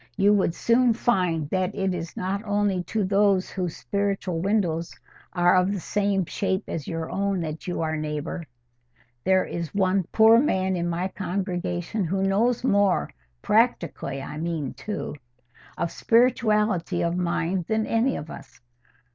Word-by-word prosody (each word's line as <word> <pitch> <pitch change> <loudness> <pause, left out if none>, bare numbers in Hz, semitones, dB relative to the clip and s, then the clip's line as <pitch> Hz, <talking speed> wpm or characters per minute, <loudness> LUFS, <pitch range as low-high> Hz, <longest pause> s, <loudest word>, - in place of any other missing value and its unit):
You 200 +1 +5
would 190 -4 +1
soon 240 0 +3
find 180 - +1
that 185 +1 0
it 195 -2 0
is 170 -1 -6
not 195 +3 -2
only 205 -3 0
to 215 +4 -1
those 195 -1 +2
whose 180 -4 -3
spiritual 200 -4 -2
windows 175 -5 0 0.4
are 175 0 +4
of 185 +1 +3
the 200 - -2
same 200 0 0
shape 190 +3 -1
as 155 -4 -5
your 165 -1 -4
own 195 -2 0
that 155 +1 -5
you 175 - -2
are 160 -1 -1
neighbour: 155 +2 -4 0.8
there 190 0 +3
is 170 +1 -5
one 190 -1 +2
poor 225 +1 +6
man 190 -8 +1
in 175 -1 -1
my 175 +2 -1
congregation 185 +1 -3
who 190 +3 -1
knows 225 +6 +1
more—practically, 180 - 0
I 150 - -7
mean, 160 -5 -3
too—of 125 - -7
spirituality 215 -7 +2
of 170 0 0
mind 175 0 -1
than 220 0 0
any 235 +4 +1
of 150 - -6
us. - - -12
185 Hz, 145 wpm, -25 LUFS, 170-205 Hz, 0.8 s, poor